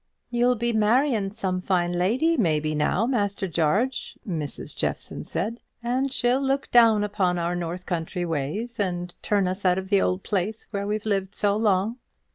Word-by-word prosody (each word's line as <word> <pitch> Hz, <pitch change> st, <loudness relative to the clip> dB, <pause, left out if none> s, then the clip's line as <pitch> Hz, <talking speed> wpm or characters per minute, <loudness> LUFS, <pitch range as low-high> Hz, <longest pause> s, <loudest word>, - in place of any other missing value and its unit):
"You'll 245 Hz, +1 st, +3 dB
be 235 Hz, +1 st, -1 dB
marrying 220 Hz, 0 st, +2 dB
some 190 Hz, -4 st, -2 dB
fine 175 Hz, -2 st, +1 dB
lady, 235 Hz, -, +2 dB
maybe 155 Hz, -, +1 dB
now, 155 Hz, +8 st, +1 dB
Master 205 Hz, -6 st, 0 dB
Jarge," 190 Hz, -, 0 dB
Mrs. 155 Hz, -6 st, -3 dB
Jeffson -, -, -3 dB
said; 230 Hz, +5 st, -2 dB, 0.2 s
"and 260 Hz, +3 st, 0 dB
she'll 250 Hz, +1 st, +2 dB
look 275 Hz, 0 st, -1 dB
down 225 Hz, -3 st, +6 dB
upon 190 Hz, -3 st, 0 dB
our 170 Hz, +1 st, -1 dB
north 175 Hz, +1 st, -4 dB
country 175 Hz, +1 st, -2 dB
ways, 175 Hz, -, -3 dB
and 180 Hz, -3 st, -2 dB
turn 200 Hz, -3 st, +1 dB
us 185 Hz, +2 st, -3 dB
out 180 Hz, -1 st, +3 dB
of 190 Hz, 0 st, -4 dB
the 200 Hz, -1 st, +4 dB
old 185 Hz, +1 st, 0 dB
place 205 Hz, +3 st, -2 dB
where 200 Hz, -1 st, -2 dB
we've 210 Hz, 0 st, -2 dB
lived 195 Hz, -2 st, -1 dB
so 205 Hz, -1 st, +2 dB
long." 210 Hz, +1 st, +1 dB
200 Hz, 170 wpm, -25 LUFS, 180-230 Hz, 0.2 s, down